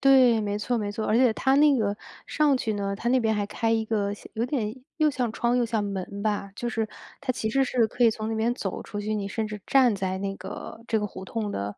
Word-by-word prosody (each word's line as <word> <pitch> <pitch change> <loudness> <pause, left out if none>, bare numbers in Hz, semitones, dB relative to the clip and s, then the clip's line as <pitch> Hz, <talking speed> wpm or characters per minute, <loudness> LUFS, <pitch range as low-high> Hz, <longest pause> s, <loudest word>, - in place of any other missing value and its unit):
对， 260 -4 +6
没 205 0 -1
错 245 +3 -1
没 205 -2 -2
错， 220 - -3
而 215 - +3
且 245 -1 +5
它 265 +4 +2
那 290 0 +6
个 205 -2 0 0.3
上 300 -3 +3
去 220 -3 -1
呢， 200 -1 -2
它 225 +4 -2
那 255 +1 +4
边 220 -2 +1
还 205 -1 -1
开 225 +2 0
一 225 -1 +1
个 205 -2 0
像 205 - -10
有 225 - 0
点 240 -5 -2 0.2
又 310 -1 +4
像 250 -5 -1
窗 235 +2 +1
又 245 - +3
像 225 -2 0
门 200 0 -4
吧， 205 -2 -1
就 240 +2 -3
是 225 -2 -1 0.4
它 265 -2 0
其 220 -3 -2
实 270 +4 +2
是 245 -3 +2
可 240 +2 +1
以 230 - +7
从 215 0 -4
那 225 - -1
边 225 +2 +1
走 195 -6 -4
出 205 - -6
去， 215 +1 -2
你 205 -2 -2
甚 220 +2 -2
至 210 0 -6
站 255 -6 +4
在 190 -1 -2
那 195 0 -3
个 190 +3 -8
这 220 -2 +1
个 210 - -1
胡 190 -1 -9
同 215 +1 -3
的 100 - -3
220 Hz, 285 characters per minute, -26 LUFS, 205-245 Hz, 0.4 s, 以